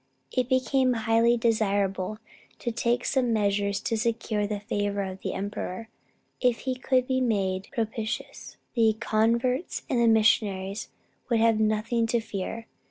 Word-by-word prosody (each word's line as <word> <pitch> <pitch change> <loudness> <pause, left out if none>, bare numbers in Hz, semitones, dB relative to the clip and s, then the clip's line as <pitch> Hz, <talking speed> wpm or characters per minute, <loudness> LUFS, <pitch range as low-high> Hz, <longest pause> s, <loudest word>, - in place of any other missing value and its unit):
It 255 -1 0
became 260 0 +2
highly 230 +1 +4
desirable 205 -3 0 0.4
to 240 - -3
take 235 +1 0
some 255 -3 +1
measures 200 -2 +1
to 230 - -1
secure 220 -2 -1
the 205 0 -3
favor 205 -1 -1
of 190 0 -6
the - - -3
emperor. 205 +2 -5 0.5
If 245 -2 +1
he 260 - -1
could 255 0 +1
be 260 0 0
made 195 -5 0
propitious, 225 -2 -4 0.2
the 225 -3 +3
converts 235 +6 +1
and 245 - +2
the 235 - +4
missionaries 210 -3 +2 0.4
would 235 -2 +3
have 225 -1 +4
nothing 220 +2 +1
to 235 +1 +1
fear. 225 +1 -5
225 Hz, 145 wpm, -27 LUFS, 205-240 Hz, 0.5 s, highly